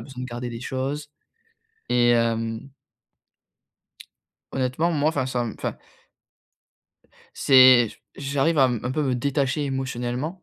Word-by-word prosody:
besoin 130 -2 -8
de - - -8
garder 120 +1 -5
les 115 0 -7
choses. 140 +3 -4 0.8
Et 120 -1 +4
hem 115 +2 -1 1.8
honnêtement 135 +6 0
moi 150 0 +1
enfin 145 -5 -1
ça 125 -2 -2
me 115 - -5
enfin - - -4 1.6
c'est, 130 -3 +6
j - - -15 0.2
j'arrive 140 +3 0
à 135 - +6
m 120 -3 -2
un 125 - -3
peu 150 +3 -1
me 130 -3 0
détacher 140 +3 -1
émotionnellement. 135 +5 -4
130 Hz, 130 wpm, -24 LUFS, 120-140 Hz, 1.8 s, c'est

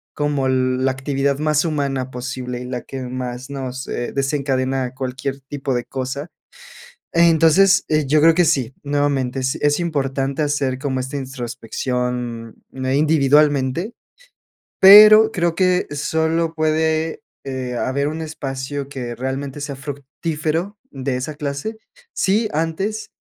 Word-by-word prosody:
como 145 -3 0
la 130 0 +1
actividad 135 +1 -1
más 150 -1 +2
humana 140 -4 -1
posible 125 0 -5
y - - -6
la 125 -1 -4
que 135 - -7
más 125 0 -5
nos, 130 -1 -5
eh, 120 - -3
desencadena 135 -2 -1
cualquier 135 +1 -4
tipo 135 0 -4
de 120 - -2
cosa. 135 +4 -5 0.9
Entonces, 170 +3 +5
eh, 155 -2 +1
yo 150 +3 +3
creo 165 +1 +6
que 175 +1 +4
sí, 135 -6 +1
nuevamente 140 -3 0
es 130 +1 -1
es 145 +2 +1
importante 140 -3 -1
hacer 145 -3 0
como 130 -1 -2
esta 130 +2 -4
introspección, 125 -2 -4 0.2
individualmente, 145 - +2 0.9
pero 215 +3 +9
creo 175 -5 0
que 185 -1 +2
solo 160 +3 0
puede, 160 0 0 0.2
eh, 130 -2 -4
haber 140 +4 -1
un 155 +2 -4
espacio 140 -2 -5
que 125 -4 -5
realmente 135 +3 -4
sea 140 -1 -4
fructífero 155 +7 -4
de 135 -1 -2
esa 130 +4 -4
clase, 150 +9 -4 0.4
si 215 +4 +1
antes 165 +8 -2
140 Hz, 130 wpm, -20 LUFS, 130-155 Hz, 0.9 s, pero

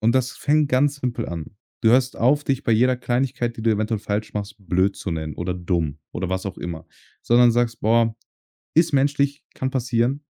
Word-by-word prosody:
Und 115 +3 +3
das 130 0 0
fängt 150 0 +1
ganz 140 +2 +2
simpel 120 -4 -3
an. 85 +3 -7 0.2
Du 110 - +4
hörst 130 +1 +3
auf, 145 +5 +3
dich 135 -1 -1
bei 115 - +2
jeder 125 +3 +3
Kleinigkeit, 125 -1 -1
die 110 - -6
du 115 - +3
eventuell 110 0 0
falsch 105 +1 -3
machst, 105 0 -4
blöd 95 +1 0
zu 90 - -4
nennen, 80 -1 -4
oder 90 +1 -2
dumm, 85 -5 -2
oder 90 0 -4
was 95 0 -2
auch 95 -2 -5
immer, 85 -2 -6 0.4
sondern 120 0 +5
sagst: 120 0 0
„Boah, 115 +1 +2 0.6
ist 165 0 +4
menschlich, 140 +1 +1
kann 130 - -2
passieren.“ 130 +2 0
115 Hz, 195 wpm, -23 LUFS, 100-130 Hz, 0.6 s, sondern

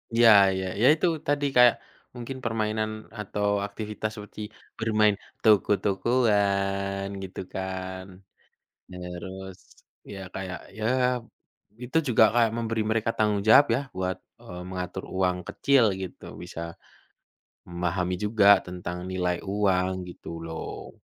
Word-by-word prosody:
Iya 115 0 +7 0.2
iya, 95 0 -2 0.2
ya - - +5
itu 160 +3 +1 0.2
tadi, 145 0 +1
kayak 125 -1 +7 0.4
mungkin 125 +2 -6
permainan 110 -1 -1 0.3
atau 105 0 -2 0.2
aktivitas 105 +1 -5
seperti 105 0 -9 0.4
bermain 105 -2 +3 0.3
toko-tokoan 100 -2 +2 0.2
gitu 95 0 -8
kan. 95 0 -5 0.8
Terus, 90 +1 -8 0.6
ya 100 - -7 0.2
kayak, 95 -1 -5 0.2
ya 110 - -3 1.0
itu 130 +6 -1
juga 110 -2 +5
kayak 115 -2 +4
memberi 115 -1 -1
mereka 115 0 +1
tanggung 105 -2 +1
jawab 140 +6 +9
ya, - - 0 0.2
buat, 95 -1 -2 0.2
eee, 90 - -9
mengatur 90 0 -5
uang 90 -1 +1
kecil 135 +5 +3 0.2
gitu, 95 - -8 0.2
bisa - - -8 1.1
memahami 90 +1 -1
juga 105 -1 +2 0.2
tentang 90 -1 -6
nilai 90 -1 0 0.2
uang 95 -3 +2 0.2
gitu 85 - -13 0.2
loh. 80 0 -7
100 Hz, 115 wpm, -26 LUFS, 95-110 Hz, 1.1 s, jawab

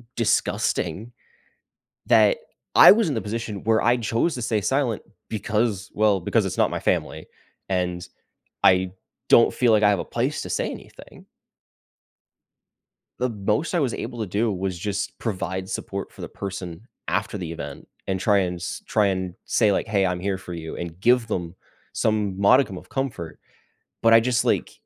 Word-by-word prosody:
disgusting 105 -1 0 1.0
that - - +5 0.4
I - - +10
was 220 -3 +2
in 145 - -1
the 110 - -1
position 110 -1 -5
where 110 0 +3
I 120 +2 +4
chose 120 +7 0
to 125 - -5
stay 110 -2 0
silent 120 +1 0 0.3
because, 105 -2 -1
well, 105 -2 +2
because 85 - +1
it's - - -4
not - - +3
my - - -2
family, - - -1 0.4
and 90 -2 -1 0.6
I 95 0 +4 0.4
don't 115 - +6
feel 120 -3 +3
like 110 -1 +4
I 105 - +6
have 100 - +1
a - - -3
place - - -2
to - - -7
say - - -1
anything - - -12 1.9
the 125 - 0
most 110 - -1
I 175 - +2
was 130 -5 0
able 120 0 -6
to 110 - -1
do 105 +5 0
was 95 -1 -3
just 100 +2 -3
provide 95 -3 -3
support - - -5
for - - -15
the - - -5
person 95 0 -7 0.2
after - - -1
the 85 -4 -5
event 75 -3 -8 0.2
and 95 -1 -1
try 100 +1 +3
and 90 -2 -1
s 85 - -5
try 105 - +2
and 95 -2 -2
say, 105 -3 +2
like, - - 0
"Hey, 100 -2 +2
I'm 90 -1 -2
here 95 0 -2
for 90 -2 -8
you," 80 -1 -6
and 85 0 -6
give 120 +2 +3
them 90 -5 -4 0.4
some 105 -3 0
modicum 100 -2 +4
of - - -15
comfort. 120 - -4 0.6
But 115 0 +5
I 115 - +9
just, 120 0 +1
like - - +1
105 Hz, 175 wpm, -24 LUFS, 95-115 Hz, 1.9 s, I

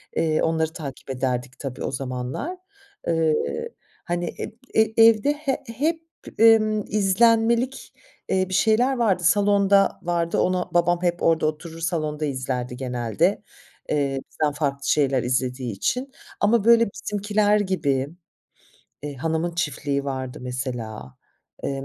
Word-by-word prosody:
Eee, 155 -1 +1
onları 160 0 0
takip 140 -4 -8
ederdik 125 -1 -2
tabii 135 -3 -5
o - - -2
zamanlar. 130 - -4 0.5
Eee, 165 -2 +2 0.7
hani, 175 -1 -2
eb - - -5 0.2
e - - +5 0.2
evde 225 +5 +5
he 290 -3 -3
hep, 310 +8 -1 0.4
ımm, 215 -2 +5
izlenmelik, 230 +5 +2 0.4
eee, 185 0 +1
bir - - -5
şeyler 230 +6 +3
vardı. 195 -7 +1
Salonda 200 +1 +3
vardı, 170 -1 0
ona 180 -1 0
babam 175 0 +2
hep 175 -1 0
orada 160 -1 +3
oturur 160 +2 -4
salonda 155 -3 -2
izlerdi 130 -3 -3
genelde, 120 -4 0 0.5
eee, 140 -2 0
bizden 150 -2 0
farklı 140 -2 -2
şeyler 135 -4 +2
izlediği 125 -1 -1
için 250 - -2 0.3
ama, 215 +1 +3
böyle, 230 -1 +6
Bizimkiler 210 +1 +1
gibi, 145 -9 0 0.9
eee, 145 -1 -5
Hanımın 160 +5 -2
Çiftliği 145 -4 -2
vardı 130 -2 -4
mesela, 120 - -5 0.5
eee, 135 0 -3
165 Hz, 125 wpm, -23 LUFS, 135-205 Hz, 0.9 s, böyle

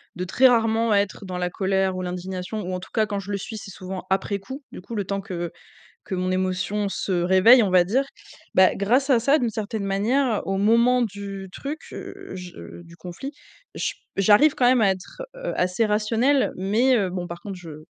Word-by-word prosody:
de 180 - -3
très 260 +8 +5
rarement 225 -1 +2
être 200 0 0
dans 185 -1 -5
la 180 0 -1
colère 190 0 0
ou - - -3
l'indignation 180 +3 -4
ou 185 -1 -4
en 180 - -2
tout 185 - -12
cas 220 -1 +2
quand 200 -1 -2
je 195 +1 -7
le 200 - 0
suis 220 +3 -7
c'est 195 -2 -9
souvent 185 0 -7
après 195 +1 0
coup, 265 +8 -9
du - - -9
coup, 215 - -10
le 205 -3 -2
temps 195 0 -2
que 175 -4 -5 0.5
que - - -4
mon 185 0 -1
émotion 185 +2 -1
se 195 - -3
réveille, 190 +7 +6
on 200 - +1
va 180 -1 +5
dire, 245 +10 +1 0.5
bah, 185 0 +5
grâce 255 +8 +1
à 245 - +5
ça, 275 +6 +3
d'une 240 -4 0
certaine 215 -1 -4
manière, 220 +5 +1
au 195 - -1
moment 235 +4 +4
du 200 -3 -5
truc, 290 +8 -5
heu, - - -9
je 180 -1 -9
du 170 0 -15
conflit, 180 +11 -7 0.4
je - - -2 0.2
j'arrive 210 +10 +5
quand 250 - +1
même 250 0 +5
à 200 - +5
être, 185 - -10 0.2
heu, - - -4
assez 180 +5 +1
rationnelle 225 +6 +2
mais 225 +7 +2
heu, 195 -5 0
bon, 180 -1 -4
par 170 0 -8
contre, 200 -2 -6
je 155 -3 -10
200 Hz, 215 wpm, -24 LUFS, 185-230 Hz, 0.5 s, réveille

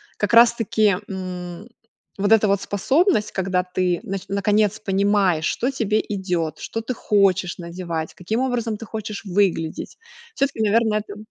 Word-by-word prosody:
как 205 - -2
раз-таки, 230 -3 +5
м, 185 0 -6 0.5
вот 205 +2 +3
эта 215 -2 +4
вот 200 -1 +2
способность, 265 - +1
когда 185 -1 0
ты 180 -1 -1
нач 195 -4 -4
наконец 205 +1 +1
понимаешь, 195 -4 +2
что 255 - 0
тебе 220 -5 0
идет, 180 -6 -2
что 225 - -4
ты 250 +3 -3
хочешь 190 -5 +1
надевать, 170 -2 -5
каким 220 +7 -2
образом 240 -4 -1
ты 225 - -8
хочешь 215 0 -6
выглядеть, 180 -4 -1 0.4
все-таки, 275 -5 -1
наверное, 215 0 +2
это 205 -1 -9
200 Hz, 145 wpm, -22 LUFS, 185-220 Hz, 0.5 s, раз-таки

